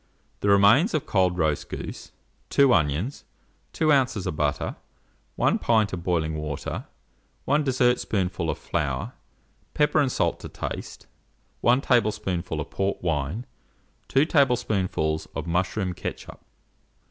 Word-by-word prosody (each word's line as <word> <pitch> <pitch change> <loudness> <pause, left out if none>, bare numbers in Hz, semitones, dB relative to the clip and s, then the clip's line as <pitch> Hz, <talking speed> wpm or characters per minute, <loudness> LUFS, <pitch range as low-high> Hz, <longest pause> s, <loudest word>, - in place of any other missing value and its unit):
The 100 - 0
remains 105 - +5
of 155 - -1
cold 90 -3 +2
roast 80 -4 0
goose, - - -7 0.4
2 140 -3 +5
onions, 80 - 0 0.5
2 155 -2 +3
oz. 130 -7 +1
of - - -2
butter, 75 -1 -1 0.6
1 - - +2
pint 110 -4 +2
of 90 - -3
boiling 85 -3 0
water, 75 -2 -5 0.6
1 150 +2 +2
dessertspoonful 110 - +1
of - - -1
flour, - - -2 0.6
pepper 150 +1 +3
and 140 -3 +2
salt - - 0
to - - -8
taste, - - -6 0.5
1 125 +3 +3
tablespoonful 105 - 0
of 75 - -5
port 95 -1 -2
wine, 80 - -1 0.6
2 135 +3 +3
tablespoonfuls 110 - +1
of 80 - -3
mushroom 90 +2 -1
ketchup. - - -7
100 Hz, 125 wpm, -25 LUFS, 85-125 Hz, 0.6 s, remains